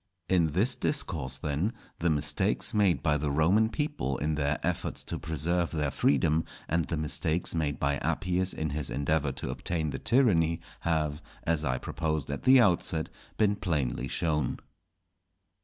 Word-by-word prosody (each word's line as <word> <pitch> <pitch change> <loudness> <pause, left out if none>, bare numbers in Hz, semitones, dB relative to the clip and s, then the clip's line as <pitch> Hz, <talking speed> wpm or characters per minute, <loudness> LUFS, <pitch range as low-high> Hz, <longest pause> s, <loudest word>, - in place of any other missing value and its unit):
In 90 -3 +3
this 95 - +2
Discourse 80 - -1
then 75 - -1 0.3
the 85 - +2
mistakes 75 -2 +1
made 100 -5 +2
by 75 -3 +3
the 75 0 -1
Roman 90 +10 +3
people 145 - -2
in 75 +1 -1
their 75 0 0
efforts - - -2
to - - -4
preserve 85 +2 0
their 75 -3 -1
freedom 75 +5 +2 0.2
and 85 0 +1
the 85 - -3
mistakes 80 +2 0
made 75 -3 -1
by 70 0 +1
Appius 90 +5 0
in 80 -1 -3
his 75 -2 -3
endeavour 70 0 0
to - - -4
obtain 80 -4 -2
the - - -4
tyranny, 85 -10 +3 0.2
have, 75 -2 -1 0.2
as 80 -2 0
I 65 -3 0
proposed 80 -1 -2
at 70 - -4
the 130 0 +7
outset, 90 -6 +2 0.3
been 105 -2 +3
plainly 75 -10 -1
shown. 75 -1 -1
80 Hz, 155 wpm, -29 LUFS, 75-90 Hz, 0.3 s, the